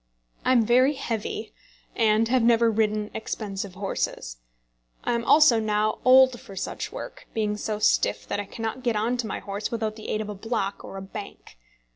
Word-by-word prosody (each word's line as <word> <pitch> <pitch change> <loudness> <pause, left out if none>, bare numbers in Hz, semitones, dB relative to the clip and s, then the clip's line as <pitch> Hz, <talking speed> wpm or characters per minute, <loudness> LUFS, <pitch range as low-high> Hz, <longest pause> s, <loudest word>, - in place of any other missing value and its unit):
I 255 - +3
am 235 -3 +4
very 255 +5 +4
heavy, 225 -4 -4 0.4
and 220 0 +3
have 255 +1 +2
never 230 0 +4
ridden 215 -1 0
expensive 200 -3 -5
horses. 185 - -3 0.7
I - - 0
am 235 0 -1
also 295 -4 +6
now 215 0 0
old 260 -1 +6
for 195 - -12
such - - -4
work, - - -8
being 210 -2 0
so 210 0 -3
stiff 105 - +1
that - - -2
I 205 - -3
cannot 225 +4 -5
get 240 -3 0
on 225 +4 +1
to 240 -2 -2
my - - -3
horse 200 +1 -4
without 220 -2 -2
the 215 - -8
aid 215 - 0
of 215 -1 -4
a - - -3
block 200 -1 -3
or 195 - -8
a 190 - -6
bank. 190 - -9
220 Hz, 190 wpm, -25 LUFS, 205-235 Hz, 0.7 s, also